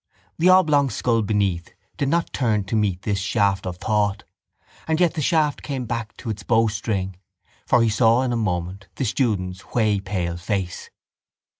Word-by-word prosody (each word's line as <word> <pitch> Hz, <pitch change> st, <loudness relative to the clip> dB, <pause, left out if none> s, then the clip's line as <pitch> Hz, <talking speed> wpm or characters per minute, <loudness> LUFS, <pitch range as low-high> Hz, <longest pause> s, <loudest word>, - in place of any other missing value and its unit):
The 175 Hz, +3 st, +5 dB
oblong 155 Hz, -7 st, +5 dB
skull 115 Hz, -2 st, +1 dB
beneath 100 Hz, -5 st, -1 dB, 0.2 s
did 140 Hz, -, -1 dB
not 170 Hz, +2 st, 0 dB
turn 110 Hz, -5 st, +1 dB
to 95 Hz, +3 st, -3 dB
meet 100 Hz, -4 st, 0 dB
this 100 Hz, -2 st, -1 dB
shaft 100 Hz, -1 st, 0 dB
of 90 Hz, -1 st, -5 dB
thought 105 Hz, 0 st, 0 dB, 0.6 s
and 160 Hz, 0 st, +1 dB
yet 175 Hz, -2 st, +3 dB
the 155 Hz, -, -3 dB
shaft 155 Hz, -1 st, +1 dB
came 135 Hz, -4 st, -4 dB
back 115 Hz, -1 st, -4 dB
to 115 Hz, -, -4 dB
its 105 Hz, -1 st, -6 dB
bowstring; 105 Hz, -4 st, 0 dB, 0.5 s
for 120 Hz, -, +4 dB
he 115 Hz, -, +3 dB
saw 115 Hz, +3 st, +3 dB
in 125 Hz, -2 st, -1 dB
a -, -, 0 dB
moment 95 Hz, -3 st, -2 dB
the 130 Hz, -, -2 dB
student's 100 Hz, -6 st, -1 dB
whey 110 Hz, -4 st, +2 dB
pale 90 Hz, -3 st, -3 dB
face. 95 Hz, 0 st, -3 dB
105 Hz, 170 wpm, -23 LUFS, 95-125 Hz, 0.6 s, The